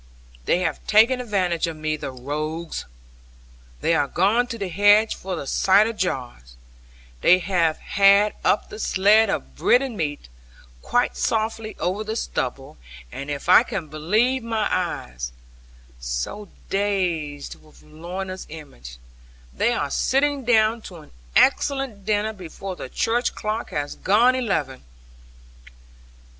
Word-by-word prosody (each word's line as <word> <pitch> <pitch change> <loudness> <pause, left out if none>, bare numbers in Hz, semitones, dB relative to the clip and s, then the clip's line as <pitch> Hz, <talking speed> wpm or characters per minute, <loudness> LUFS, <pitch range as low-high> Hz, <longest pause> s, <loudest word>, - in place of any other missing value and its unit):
They 180 - +2
have 175 - -2
taken 230 +4 +4
advantage 185 -8 0
of 165 - -5
me, 155 0 -2
the 150 - -6
rogues! 150 +6 -5 1.0
They 165 - +2
are 145 -3 +2
gone 210 - +2
to 230 -2 -5
the 200 -3 -3
hedge 205 +4 +4
for 190 -1 -5
the - - -6
cider 200 +9 +3
jars; 125 - -4 0.7
they 180 - +6
have 175 -4 +1
had 200 +1 +4
up - - +1
the 215 - -9
sledd 210 +2 +4
of - - -3
bread 250 +2 +3
and 260 -4 -5
meat, 145 - -3 0.5
quite 245 0 0
softly 220 0 -2
over 185 +5 -1
the 220 +1 -4
stubble, 135 - -4 0.3
and 140 +1 -7
if 145 +1 -5
I 180 - +8
can 195 -10 -5
believe 215 - +1
my 225 -2 -1
eyes 60 - -3 0.7
(so - - -4 0.2
dazed 175 -8 -2
with 155 - -20
Lorna's 180 +5 -7
image), 65 - -11 0.6
they 235 - +1
are 240 - -2
sitting 280 +1 +1
down 225 -1 +3
to 180 - -12
an 155 -3 -14 0.2
excellent 270 -7 +2
dinner, 215 +1 +1
before 190 0 -8
the 130 - -8
church 240 - 0
clock 215 +1 -3
has 145 -1 -3
gone 230 +6 +4
eleven! 190 - -2
195 Hz, 135 wpm, -23 LUFS, 155-220 Hz, 1.0 s, I